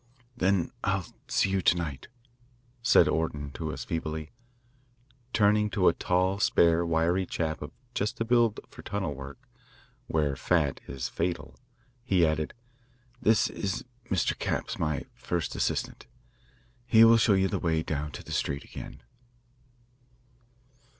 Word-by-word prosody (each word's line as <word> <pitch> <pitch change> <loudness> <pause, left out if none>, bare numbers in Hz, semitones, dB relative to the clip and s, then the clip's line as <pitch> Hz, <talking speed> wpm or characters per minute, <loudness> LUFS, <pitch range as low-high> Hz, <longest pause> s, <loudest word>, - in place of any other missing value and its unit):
"Then 95 -5 +1
I'll - - 0 0.2
see 95 - +1
you 95 0 +1
to 90 - +4
night," 75 -7 -4 0.7
said 115 - +5
Orton 75 -3 -1
to 80 +1 -4
us 65 -3 -6
feebly. 80 -1 -4 1.0
Turning 105 -1 +3
to 100 -4 +2
a - - +1
tall, 95 +3 +1
spare, 85 -4 +4
wiry 85 +3 +1
chap, 80 -2 -2
of 75 - -5 0.2
just 105 -1 -1
the 115 - -1
build 120 -2 +3
for - - -12
tunnel 95 -7 -3
work, 70 0 -10 0.6
where 75 -3 0
fat - - +1
is 65 -1 -4
fatal, 85 +1 -3 0.4
he 95 -8 +3
added: 80 -1 -1 0.7
"This 110 0 +4
is 95 +2 -3 0.2
Mr. 95 - +1
Capps, - - -2
my 75 -3 -1
first 85 -2 -3
assistant. - - -2 0.8
He 115 -2 +7
will 115 0 +8
show 110 -2 +4
you 95 0 +3
the - - -2
way 80 -2 0
down 75 -1 -3
to - - -8
the - - -10
street 70 - -1
again." - - -10
85 Hz, 140 wpm, -28 LUFS, 80-100 Hz, 1.0 s, will